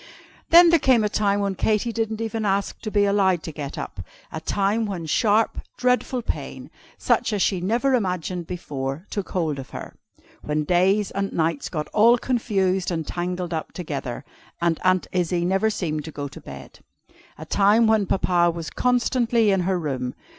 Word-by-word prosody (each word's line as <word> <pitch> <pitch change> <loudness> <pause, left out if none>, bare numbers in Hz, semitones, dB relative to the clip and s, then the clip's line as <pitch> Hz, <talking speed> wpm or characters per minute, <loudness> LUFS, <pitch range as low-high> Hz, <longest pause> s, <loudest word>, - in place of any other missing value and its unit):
Then 340 0 +8
there 335 - +5
came 255 -5 +4
a 210 - +1
time 205 -1 +1
when 200 -1 0
Katy 215 +4 0
didn't 220 -1 -2
even 225 0 -3
ask 200 -1 -1
to 215 - -4
be 205 -1 +2
allowed 190 -4 +2
to 160 - -5
get 145 -2 -6
up. - - -6 0.3
A 160 - -5
time 205 +6 0
when 180 -5 -4
sharp, 215 +7 +2 0.2
dreadful 250 0 0
pain, - - -5 0.3
such - - +1
as 205 -3 +1
she 185 -3 0
never 235 +8 +1
imagined 180 -6 -1
before, 145 -3 -5
took 200 -2 -4
hold 160 -6 -1
of 130 - -8
her. - - -8 0.5
When 150 0 -1
days 185 +5 +2
and 195 0 -2
nights 160 -3 -1
got 155 -4 -3
all 230 +3 +5
confused 195 -7 0
and 165 -3 -2
tangled 180 +1 -3
up 160 - -4
together, 140 -8 -5 0.3
and 170 -1 +1
Aunt 185 0 +3
Izzie 175 -1 0
never 195 +4 +2
seemed 155 -8 -3
to 160 - -7
go 145 -1 -5
to - - -12
bed. - - -11 0.6
A 155 - -8
time 205 +6 +4
when 220 -3 +3
Papa 175 -2 +2
was 165 -1 -5
constantly 240 -3 +2
in 195 - +2
her 185 +1 0
room. 130 -6 -3
190 Hz, 180 wpm, -23 LUFS, 170-220 Hz, 0.6 s, Then